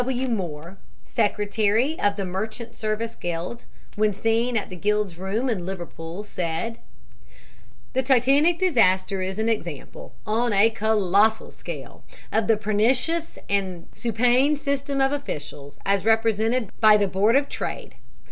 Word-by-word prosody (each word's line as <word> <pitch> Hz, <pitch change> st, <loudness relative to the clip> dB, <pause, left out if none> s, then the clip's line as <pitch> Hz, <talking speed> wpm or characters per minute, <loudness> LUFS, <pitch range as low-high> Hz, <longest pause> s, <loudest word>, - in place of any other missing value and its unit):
T. -, -, +1 dB
W. 260 Hz, 0 st, -1 dB
Moore, 175 Hz, -4 st, -4 dB, 0.3 s
Secretary 215 Hz, +5 st, +1 dB
of 205 Hz, 0 st, +2 dB
the 200 Hz, -2 st, -3 dB
Merchant 220 Hz, +5 st, -5 dB
Service 220 Hz, +1 st, -2 dB
Guild, 175 Hz, +7 st, -5 dB, 0.3 s
when 210 Hz, -1 st, +2 dB
seen 230 Hz, +4 st, +1 dB
at 205 Hz, -, -3 dB
the -, -, -6 dB
guild's 205 Hz, -1 st, 0 dB
rooms 205 Hz, +8 st, -1 dB
in 190 Hz, -6 st, -2 dB
Liverpool, 175 Hz, 0 st, -6 dB
said: 180 Hz, +3 st, -3 dB, 1.1 s
"The 260 Hz, -, +2 dB
Titanic 275 Hz, +6 st, +4 dB
disaster 195 Hz, -, +2 dB
is 190 Hz, +1 st, -3 dB
an 220 Hz, +1 st, 0 dB
example, 170 Hz, -, -4 dB
on 230 Hz, +1 st, +1 dB
a 205 Hz, +3 st, +5 dB
colossal 220 Hz, 0 st, +2 dB
scale, -, -, -9 dB, 0.3 s
of 220 Hz, -1 st, +1 dB
the 225 Hz, -1 st, +4 dB
pernicious 245 Hz, +10 st, 0 dB
and 190 Hz, -4 st, -2 dB
supine 245 Hz, +5 st, +2 dB
system 280 Hz, -1 st, -2 dB
of 270 Hz, 0 st, +3 dB
officials, 145 Hz, -, -6 dB
as 200 Hz, -1 st, +2 dB
represented 225 Hz, 0 st, +1 dB
by 215 Hz, -1 st, +8 dB
the 205 Hz, -1 st, +1 dB
Board 200 Hz, +5 st, +2 dB
of 280 Hz, +1 st, +3 dB
Trade. -, -, -5 dB
215 Hz, 140 wpm, -24 LUFS, 195-240 Hz, 1.1 s, by